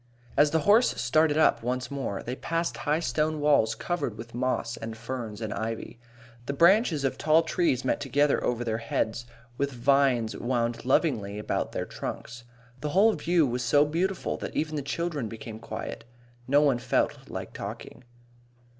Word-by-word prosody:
As 145 +1 +5
the 160 +1 +1
horse 215 +8 +4
started 150 +6 +3
up 155 - +4
once 125 +3 -3
more, 135 -8 -3
they 125 - -4
passed 165 +4 -2
high 155 +2 0
stone 155 +3 0
walls 140 -7 +3
covered 140 -5 -3
with 115 +1 -9
moss 125 -1 -1
and 110 0 -7
ferns 115 -2 -6
and 110 -2 -3
ivy. 115 +2 -5 0.5
The 140 - -1
branches 170 - +4
of 135 - -1
tall 155 +2 +4
trees 160 -6 0
met - - +1
together 145 +1 +2
over 120 -1 0
their 110 -1 -2
heads, 115 +1 -2 0.3
with 140 0 0
vines 125 -2 +2
wound 120 -1 -1
lovingly 120 -8 +1
about 105 - -2
their - - -2
trunks. 120 +1 -7 0.3
The 150 - -3
whole 205 +7 +5
view 165 0 +2
was 125 -1 -2
so 145 0 +4
beautiful 175 +5 -1
that - - -6
even 155 0 -1
the 145 - -1
children 145 -3 -3
became 110 0 -8
quiet. 115 - -6 0.4
No 140 +2 +5
one 140 -5 +3
felt - - -1
like - - -6
talking. - - -8
135 Hz, 170 wpm, -27 LUFS, 115-155 Hz, 0.5 s, As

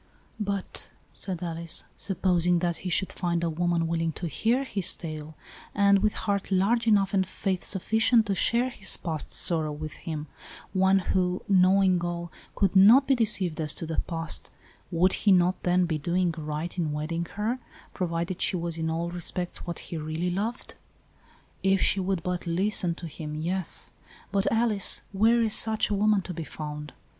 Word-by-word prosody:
" - - -34 0.2
But," 195 - -6 0.2
said 180 -3 -4
Alice, 165 -1 -1
" - - -36
supposing 180 -2 +2
that 170 -1 -1
he 180 - -5
should 185 +2 0
find 170 -2 -1
a 165 - 0
woman 170 +1 0
willing 165 0 -1
to 175 - -6
hear 230 - +1
his 200 -9 +3
tale, 155 -2 -7 0.4
and 200 -1 +5
with 210 +1 +1
heart 200 -1 -1
large 225 +5 +2
enough 200 -3 +3
and 190 -1 +3
faith 185 0 -3
sufficient 220 +4 +2
to 200 - 0
share 235 +6 +1
his 195 -5 +2
past 160 -4 -4
sorrow 160 -3 +1
with 155 +1 -6
him, 155 -2 -6 0.5
one 190 0 +4 0.2
who, 180 -1 0
knowing 185 -1 +4
all, 175 -1 -4 0.2
could 195 -1 +1
not 220 +8 +8
be 270 - +4
deceived 195 -9 +2
as 150 -2 +1
to - - -4
the 160 0 -3
past, 165 -2 -4 0.4
would 180 +2 +2
he 205 - +2
not 180 0 +3
then 180 0 +2
be 160 -3 -2
doing 175 +3 0
right 155 +3 -4
in 155 -3 -1
wedding 165 +3 -2
her, 220 +5 -1 0.3
provided 170 0 -2
she 195 - +2
was 170 -1 -3
in 160 0 -1
all 170 +1 -2
respects 175 +1 -4
what 170 - -4
he 170 - -6
really 155 +3 -2
loved?" 215 +7 -3 0.5
" - - -31
If - - -1
she 195 - +2
would 185 -2 -1
but 180 -1 -3
listen 180 0 +1
to 175 - -9
him, 150 -1 -7
yes. 175 +3 -2 0.4
But, 200 0 +1
Alice, 225 -3 +1
where 225 +4 +3
is 220 -2 0
such 220 -1 +1
a - - +2
woman 205 -1 +2
to 180 - -6
be 165 -1 -5
found? 150 -1 -7
180 Hz, 185 wpm, -27 LUFS, 165-195 Hz, 0.5 s, not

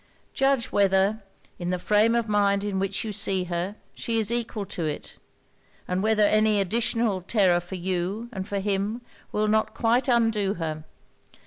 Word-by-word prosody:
Judge 270 -3 +1
whether, 200 +2 +2 0.4
in 175 0 -3
the 180 - 0
frame 210 +5 +3
of 235 -1 0
mind 200 -1 +2
in 200 -2 -2
which 195 0 -1
you 220 - -4
see 195 -2 0
her, 180 +3 -3 0.2
she 230 -1 -2
is 220 0 +1
equal 230 -3 -2
to 185 -3 -5
it; 150 -1 -5 0.7
and 180 +1 -1
whether 215 0 +3
any 215 0 +3
additional 225 0 +1
terror 185 -2 +3
for 175 +2 -8
you 185 +5 -2
and 190 -1 -5
for 205 - -3
him 200 +3 -1 0.3
will 210 0 0
not 220 +1 +1
quite 240 +3 +2
undo 225 -5 +2
her. 155 -2 -4
205 Hz, 165 wpm, -25 LUFS, 190-220 Hz, 0.7 s, frame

